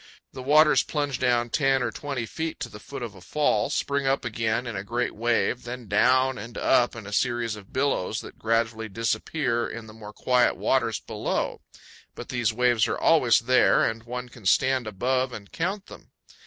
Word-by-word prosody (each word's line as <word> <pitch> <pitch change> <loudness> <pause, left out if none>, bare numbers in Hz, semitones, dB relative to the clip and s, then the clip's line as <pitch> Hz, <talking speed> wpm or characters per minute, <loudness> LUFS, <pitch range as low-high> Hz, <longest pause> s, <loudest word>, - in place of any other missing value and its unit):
The 130 - -7
waters 150 +3 +5
plunge 145 -4 -2
down 120 -2 +1
ten 135 -3 +2
or 120 - -1
twenty 140 -4 -4
feet 160 +8 -5
to - - -4
the 105 - -11
foot 135 +4 -8
of 115 -4 -6
a 95 - -14
fall, 150 +11 +1
spring 140 -1 -1
up 135 -1 +1
again 115 +1 -1
in 120 -2 -5
a 95 - -4
great 120 +4 -2
wave, 120 +2 0
then 120 -1 -7
down 130 +5 +3
and 115 +3 -8
up 120 -2 +2
in 115 -3 -8
a 105 - -7
series 120 -1 0
of 100 -3 -13
billows 130 -7 0
that - - -12
gradually 115 0 0
disappear 120 +3 -1
in 115 -1 -7
the 110 - -12
more 105 -1 -10
quiet 125 +2 +2
waters 120 -5 +1
below; - - -3 0.5
but - - -9
these 120 -4 0
waves 120 -1 +2
are - - -2
always 130 -10 +4
there, 125 +2 +4
and 115 0 -2
one 125 +1 -5
can 120 -5 -8
stand 130 +2 +2
above 125 +5 0
and 100 -4 -9
count 190 +4 -3
them. - - -14
120 Hz, 195 wpm, -26 LUFS, 110-130 Hz, 0.5 s, waters